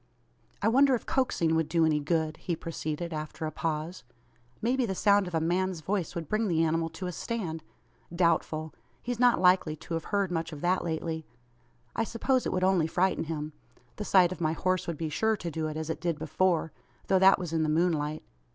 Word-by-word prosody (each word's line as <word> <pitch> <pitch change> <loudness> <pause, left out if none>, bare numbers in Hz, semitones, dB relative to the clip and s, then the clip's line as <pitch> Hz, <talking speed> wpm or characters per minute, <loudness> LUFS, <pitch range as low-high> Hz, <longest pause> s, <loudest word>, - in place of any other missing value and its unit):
"I - - +3
wonder 265 +3 +5
if 235 - -5
coaxing 175 -11 +1
would 160 -1 +1
do 165 -2 +3
any 155 -1 +2
good?" 155 +1 -1
he 175 - -3
proceeded, 165 +1 -4
after 155 +1 -5
a 155 - -3
pause. 160 0 -3 0.6
"Maybe 250 +3 +1
the 190 - -2
sound 200 0 +3
of 175 - -4
a - - +3
man's 175 +1 0
voice 185 0 -2
would 165 -3 -4
bring 215 +4 0
the 165 -3 +2
animal 165 0 +1
to 165 +3 -7
a 180 - -2
stand? 175 -5 -4 0.5
Doubtful. 160 -3 0 0.3
He's 245 -1 -3
not 245 -1 +5
likely 180 -4 +4
to 165 +2 -6
've - - -18
heard 200 -3 0
much 165 -1 -2
of 150 -2 -8
that 180 +1 +1
lately. 160 -1 -3 0.7
I 225 - +1
suppose 250 +3 0
it - - -1
would 185 0 0
only 185 -4 +3
frighten 180 +1 +1
him! 155 -1 -4 0.4
The 210 - -3
sight 185 -3 +4
of 185 - -6
my 155 -1 +1
horse 185 +3 0
would 170 -2 -3
be 160 0 -3
sure 220 +8 +1
to 175 -3 -5
do 160 0 -2
it, 155 0 -5
as 160 0 -3
it - - -6
did 170 -3 -1
before; 160 +1 0 0.3
though 190 - +3
that 190 +1 +7
was 175 -3 -5
in 160 - +1
the 155 - +1
moonlight. 155 -2 0
170 Hz, 215 wpm, -29 LUFS, 160-190 Hz, 0.7 s, that